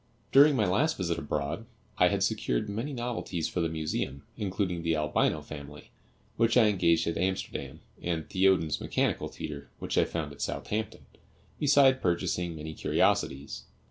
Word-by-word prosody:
During 145 +1 +7
my 110 -5 +2
last 145 - +2
visit 85 -3 -1
abroad 75 +7 -3 0.3
I - - +7
had - - +1
secured - - 0
many 115 +8 -3
novelties 120 - -3
for 90 - -2
the 80 - 0
Museum, 75 -3 -3
including 95 -3 -2
the 80 -1 +1
Albino 75 0 +1
Family, 75 0 -10 0.5
which 115 +1 +3
I 110 -3 +6
engaged 85 -4 +3
at 85 - -2
Amsterdam, 95 +1 -3 0.2
and 85 -3 -2
Thiodon's 95 -5 +2
mechanical - - 0
theatre, 70 -2 -7
which - - -1
I - - +4
found 80 -3 -4
at 70 - -11
Southampton, 110 +1 -3 0.5
beside 135 -2 +5
purchasing 85 -1 0
many 80 0 -6
curiosities. 70 -2 0
85 Hz, 150 wpm, -29 LUFS, 75-105 Hz, 0.5 s, During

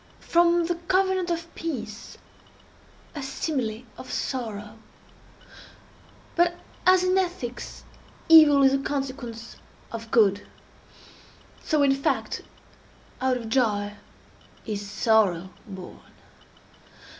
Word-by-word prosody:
—from 345 0 +3
the 350 - 0
covenant 375 -1 +2
of 335 -1 -3
peace, 250 -10 -6 1.0
a 295 - -5
simile 260 -5 -3 0.2
of 255 - -9
sorrow? 220 -4 -4 1.6
But 345 0 +3 0.3
as, 370 0 +6
in 370 0 +2
ethics, 345 -10 -4 0.4
evil 305 -4 +8
is 270 0 +5
a 275 - +2
consequence 260 -5 -5 0.3
of 230 -1 -7
good, 205 -3 +3 1.2
so, 305 -2 +2
in 275 -1 +4
fact, 275 0 -1 0.8
out 260 -1 +2
of 230 -2 -7
joy 210 -4 +1 0.7
is 205 -2 -4
sorrow 200 -4 +2 0.2
born. 190 -3 -9
260 Hz, 100 wpm, -25 LUFS, 220-330 Hz, 1.6 s, evil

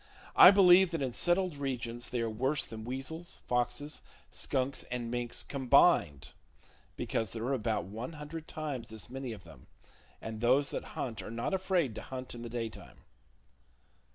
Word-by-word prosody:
I - - +11
believe 190 -2 +7
that 165 -3 -3
in 130 -2 -2
settled 175 0 +1
regions 120 -4 -4
they 120 - -1
are 115 - 0
worse 130 +6 0
than 110 -1 -8
weasels, 135 +7 -6
foxes, 135 +5 -1 0.3
skunks 135 +1 -1
and 120 -1 -4
mink 120 -1 -2 0.2
combined; 135 - +3 0.6
because 110 -3 -2
there 115 +2 -5
are 130 +3 0
about 115 -6 0
one 110 - -6
hundred 155 +1 -7
times 140 -8 -5
as 110 0 -8
many 130 -1 -5
of 105 -4 -9
them, 80 -6 -15 0.5
and 110 -1 -6
those 130 +4 +3
that - - -3
hunt 115 -4 -3
are - - -8
not 115 - -3
afraid 185 - +1
to - - -6
hunt 130 -1 -7
in 120 - -8
the 120 - -6
daytime. 115 -2 -6
125 Hz, 165 wpm, -32 LUFS, 115-150 Hz, 0.6 s, I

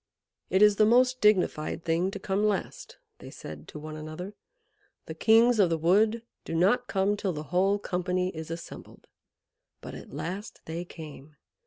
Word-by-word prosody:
"It 190 +2 +4
is 210 -1 +5
the 215 - +5
most 255 +2 +3
dignified 180 -6 +2
thing 170 +2 +1
to 200 - -6
come 195 +1 -1
last!" 210 -2 -2 0.2
they - - -10
said 75 0 -10
to - - -9
one 155 +1 -8
another. 155 +6 -7 0.7
"The - - -6
kings 230 +1 +4
of 190 -4 +5
the 165 - 0
wood 215 +8 +2 0.2
do 165 - -5
not 210 +9 +2
come 195 +1 +1
till 195 -3 -2
the 150 -1 -5
whole 195 +3 +3
company 180 -1 -2
is 160 0 -7
assembled." 165 0 -9 0.7
But - - -9
at - - -10
last 175 +9 -6
they 165 +2 -5
came. 150 -3 -11
185 Hz, 170 wpm, -28 LUFS, 165-210 Hz, 0.7 s, is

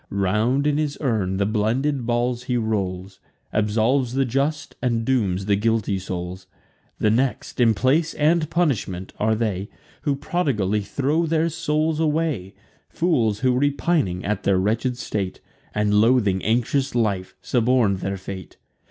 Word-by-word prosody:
Round 105 +8 +1
in 150 0 +2
his 150 -2 -1
urn 105 -9 0
the 100 - +1
blended 120 +5 0
balls 120 +1 0
he 125 -1 0
rolls, 95 -4 -2 0.3
Absolves 115 +4 +1
the 135 0 +2
just, 140 +4 -1
and 115 -3 0
dooms 100 -8 +1
the 100 0 +3
guilty 105 -2 0
souls. 90 0 -6 0.5
The 105 - +2
next, 130 +3 -1
in 115 -2 +5
place 150 +8 +1
and 155 +1 +2
punishment, 110 - -1
are 110 +1 +2
they 105 -3 -2 0.3
Who 145 - 0
prodigally 125 - 0
throw 145 +10 0
their 165 +1 +1
souls 155 -1 0
away; 155 - -1 0.3
Fools, 115 - +1
who, 130 -1 +3
repining 140 - 0
at 105 -1 -1
their 100 -1 +2
wretched 115 +6 0
state, 100 -6 -3 0.3
And 105 0 0
loathing 105 -3 +3
anxious 125 +5 0
life, 100 -6 0
suborn'd 120 -5 +2
their 95 +1 -3
fate. 95 0 -8
115 Hz, 145 wpm, -23 LUFS, 100-140 Hz, 0.5 s, in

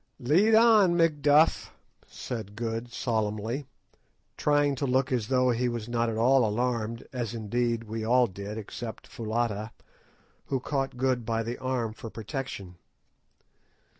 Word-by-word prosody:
"Lead 185 - +4
on, 215 -6 +6
Macduff," 150 -2 +3 0.4
said 110 -4 -6
Good 115 +1 -4
solemnly, 110 +3 -2 0.7
trying 145 -1 +2
to 140 - -1
look 130 +1 +1
as 120 -5 0
though 130 0 +3
he 120 +1 0
was 120 -2 -4
not 120 -1 0
at 110 - -3
all 130 +3 +4
alarmed, 115 0 -1
as 120 -2 -3
indeed 115 +1 -1
we 110 0 -5
all 125 +3 +4
did 100 +1 -7
except 110 +1 -7
Foulata, 110 -1 -2 0.8
who 135 - -1
caught 135 0 -2
Good 130 -1 +1
by 115 0 -1
the 120 +2 -5
arm 125 -4 -2
for 115 - -8
protection. 110 -5 -6
120 Hz, 135 wpm, -28 LUFS, 110-130 Hz, 0.8 s, on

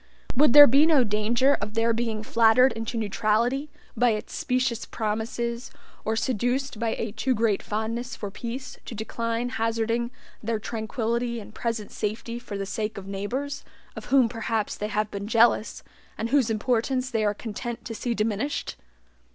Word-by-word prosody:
Would 280 -1 +5
there 290 0 +12
be 285 +5 +5
no 300 -6 +5
danger 230 +5 +2
of 210 +1 -4
their 230 +1 +3
being 225 -2 -2
flattered 230 +4 +5
into 225 +1 -4
neutrality 225 +6 +1 0.3
by 245 0 +4
its 215 - -5
specious 250 -2 0
promises, 230 +2 -3 0.3
or 220 - 0
seduced 245 +2 -1
by 230 -1 0
a 225 - -3
too 255 +4 0
great 220 -2 +1
fondness 230 +4 -3
for 205 -5 -6
peace 250 +5 -6
to 235 - -7
decline 230 +2 -2
hazarding 230 +1 0 0.3
their 225 +1 -1
tranquillity 230 +2 -2
and 215 - -11
present 230 -3 -3
safety 225 +2 -3
for 225 -5 -6
the 195 - -3
sake 210 +2 -3
of 195 - -7
neighbors, 250 +9 -4 0.3
of - - -7
whom 265 -3 +4
perhaps 225 -2 -2
they 210 - -3
have 215 0 -1
been 200 0 -5
jealous, 230 0 +3 0.3
and 225 - -2
whose 265 -3 +3
importance 250 +3 0
they 225 -3 +1
are 210 0 +1
content 230 +2 -6
to 230 - -5
see 235 +1 -2
diminished? 215 - -2
230 Hz, 165 wpm, -26 LUFS, 215-245 Hz, 0.3 s, there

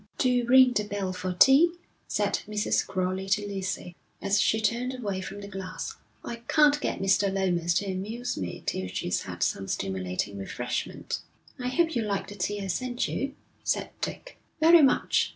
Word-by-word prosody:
'Do 250 -1 +2
ring 255 0 +7
the 210 - +1
bell 200 -2 -3
for 185 0 -3
tea,' 275 - +6 0.3
said - - 0
Mrs. 210 -1 0
Crowley 185 +1 -2
to 205 +1 +1
Lucy, 190 -3 -4 0.2
as 200 +1 +2
she 220 - +2
turned 235 +4 0
away 200 -6 -3
from 195 +2 -7
the 200 - -7
glass. 195 - -6 0.3
'I 235 - -4
can't 295 -1 +4
get - - -1
Mr. 195 +1 +3
Lomas 175 -3 +1
to 205 - +1
amuse 205 +6 -3
me 90 -3 -5
till 95 - -2
he's 90 -1 -2
had 85 -2 -4
some 95 +2 -1
stimulating 95 +1 -2
refreshment.' 125 +5 -3 0.4
'I 250 - -2
hope 325 +5 +1
you 235 - +2
like 200 -2 -2
the - - -7
tea 205 +1 -2
I - - -3
sent 245 +6 -1
you,' 275 +1 -3 0.3
said - - -1
Dick. - - -5 0.2
'Very 330 +1 +8
much. 270 - +3
200 Hz, 175 wpm, -27 LUFS, 185-250 Hz, 0.4 s, Very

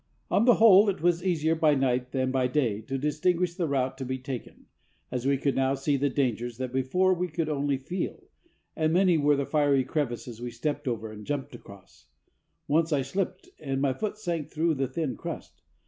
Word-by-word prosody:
On 220 - +3
the 245 -2 +7
whole, 210 -2 +7
it 190 -4 -3
was 175 0 +2
easier 160 -4 +1
by 155 -2 +3
night 125 -2 0
than 130 -1 0
by 130 -1 +1
day 125 -6 0
to 135 +5 -4
distinguish 170 +5 0
the 175 -2 -2
route 130 -1 -1
to - - -3
be 130 0 -3
taken, 130 -2 -7 0.5
as 125 +1 -2
we 140 0 +3
could 140 0 0
now 135 +1 +2
see 140 +2 0
the 140 +1 +1
dangers 120 -3 -1
that 130 -1 -4
before 180 +9 +2
we 180 0 -1
could 165 -1 -2
only 145 -2 0
feel; 175 +8 -5 0.5
and 155 0 +1
many 180 -2 +4
were 145 0 +4
the 140 0 -1
fiery 145 -3 +2
crevices 120 -4 -3
we 120 - -4
stepped 130 +5 -3
over 110 -3 -3
and 105 -1 -10
jumped 145 -3 -3
across. 100 -5 -14 0.6
Once 160 +2 +2
I 140 -3 +2
slipped, 185 +8 -3
and 135 -3 -2
my 135 -1 +1
foot 210 +8 -4
sank 170 -8 -3
through 160 +1 +1
the 135 -2 -1
thin 135 0 -3
crust. - - -7
140 Hz, 205 wpm, -27 LUFS, 130-165 Hz, 0.6 s, the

